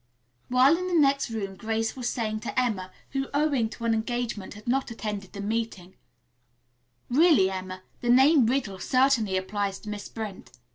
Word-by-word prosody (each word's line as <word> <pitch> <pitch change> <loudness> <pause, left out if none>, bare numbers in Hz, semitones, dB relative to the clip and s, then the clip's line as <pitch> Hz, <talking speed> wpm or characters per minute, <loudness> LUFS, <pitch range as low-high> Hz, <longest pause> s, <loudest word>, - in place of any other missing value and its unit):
While 255 +6 +5
in 365 - -3
the 360 - 0
next 275 -2 +3
room 200 -4 -4
Grace 225 +3 -2
was 250 -2 -2
saying 215 -2 -2
to 215 - -2
Emma, 210 -7 -1 0.2
who, 270 0 -2
owing 285 -6 +2
to 230 +1 -7
an 230 - +3
engagement, 225 -3 -3
had 210 +2 -13
not 265 +2 +1
attended 210 -4 -5
the 200 - -6
meeting, 205 -4 -3 1.1
"Really, 270 - +4
Emma, 185 0 -6 0.2
the 240 - -3
name 265 +1 +6
'Riddle' 230 -7 -1
certainly 255 -7 +2
applies 195 +1 -2
to 215 - -8
Miss 210 -1 -6
Brent. 215 -4 -7
225 Hz, 170 wpm, -27 LUFS, 200-255 Hz, 1.1 s, name